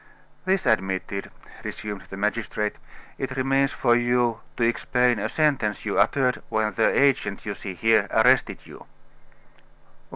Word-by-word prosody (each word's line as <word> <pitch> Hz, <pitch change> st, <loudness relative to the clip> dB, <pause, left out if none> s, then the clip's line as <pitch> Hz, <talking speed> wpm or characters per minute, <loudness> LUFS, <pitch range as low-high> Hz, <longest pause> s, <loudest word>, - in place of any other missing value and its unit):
"This 190 Hz, 0 st, +1 dB
admitted," 95 Hz, -1 st, -1 dB, 0.3 s
resumed 105 Hz, -2 st, -6 dB
the 95 Hz, -, -8 dB
magistrate, 105 Hz, 0 st, -2 dB, 0.4 s
"it 130 Hz, -, -4 dB
remains 135 Hz, +1 st, +2 dB
for 120 Hz, -2 st, +2 dB
you 120 Hz, -1 st, +1 dB, 0.2 s
to 120 Hz, -, 0 dB
explain 120 Hz, 0 st, +1 dB
a 110 Hz, -, -2 dB
sentence 135 Hz, -9 st, 0 dB
you 100 Hz, -, 0 dB
uttered 130 Hz, -3 st, +2 dB
when 110 Hz, -1 st, 0 dB
the 110 Hz, -, +3 dB
agent 135 Hz, -8 st, +1 dB
you 100 Hz, -, -3 dB
see 95 Hz, -2 st, -7 dB
here 110 Hz, +2 st, +3 dB
arrested 125 Hz, +3 st, +3 dB
you." -, -, -13 dB
115 Hz, 135 wpm, -24 LUFS, 105-130 Hz, 0.4 s, the